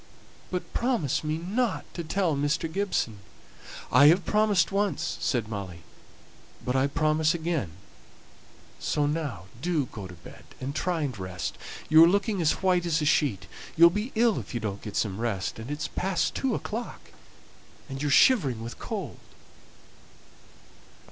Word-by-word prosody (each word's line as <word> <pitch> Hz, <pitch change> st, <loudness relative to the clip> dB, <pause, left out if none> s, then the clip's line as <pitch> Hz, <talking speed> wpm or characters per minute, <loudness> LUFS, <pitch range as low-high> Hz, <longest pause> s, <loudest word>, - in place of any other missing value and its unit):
But 180 Hz, -1 st, -4 dB
promise 235 Hz, -, 0 dB
me 155 Hz, +1 st, -1 dB
not 205 Hz, +6 st, -1 dB
to 170 Hz, -, -4 dB
tell 165 Hz, 0 st, 0 dB
Mr. 145 Hz, +4 st, 0 dB
Gibson." 160 Hz, -, -1 dB, 0.7 s
"I 140 Hz, +4 st, +7 dB
have 170 Hz, +3 st, +5 dB
promised 210 Hz, -4 st, +2 dB
once," 200 Hz, 0 st, -1 dB
said 120 Hz, -5 st, 0 dB
Molly, 95 Hz, -6 st, -6 dB, 0.8 s
"but 125 Hz, -, -1 dB
I 135 Hz, +1 st, +3 dB
promise 155 Hz, +2 st, +2 dB
again; 160 Hz, -, -2 dB, 1.1 s
so 150 Hz, -, 0 dB
now 145 Hz, -, -2 dB, 0.2 s
do 165 Hz, -4 st, 0 dB
go 105 Hz, -5 st, -8 dB
to 90 Hz, -, -11 dB
bed, 85 Hz, -, -14 dB, 0.2 s
and 135 Hz, +2 st, -4 dB
try 170 Hz, +1 st, -1 dB
and 140 Hz, -5 st, -2 dB
rest. 90 Hz, -1 st, -4 dB, 0.3 s
You 160 Hz, +1 st, +8 dB
are -, -, +8 dB
looking 200 Hz, 0 st, +1 dB
as 160 Hz, +3 st, +1 dB
white 180 Hz, -2 st, +2 dB
as 165 Hz, -1 st, +2 dB
a 150 Hz, -, -1 dB
sheet; 125 Hz, -, +2 dB, 0.3 s
you'll 170 Hz, +1 st, +8 dB
be 210 Hz, +7 st, -3 dB
ill 230 Hz, -1 st, +3 dB
if -, -, -8 dB
you -, -, 0 dB
don't 100 Hz, -3 st, -4 dB
get 105 Hz, -, -7 dB
some 100 Hz, -2 st, -1 dB
rest; 115 Hz, -3 st, -2 dB
and 115 Hz, +3 st, -7 dB
it's 150 Hz, +1 st, -3 dB
past 190 Hz, 0 st, -1 dB
two 260 Hz, -5 st, 0 dB
o'clock, 230 Hz, +3 st, -6 dB, 0.8 s
and 135 Hz, -1 st, -6 dB
you're 145 Hz, -, 0 dB
shivering 140 Hz, -, +4 dB
with 115 Hz, -, -8 dB
cold." -, -, -5 dB
155 Hz, 155 wpm, -27 LUFS, 120-185 Hz, 1.1 s, You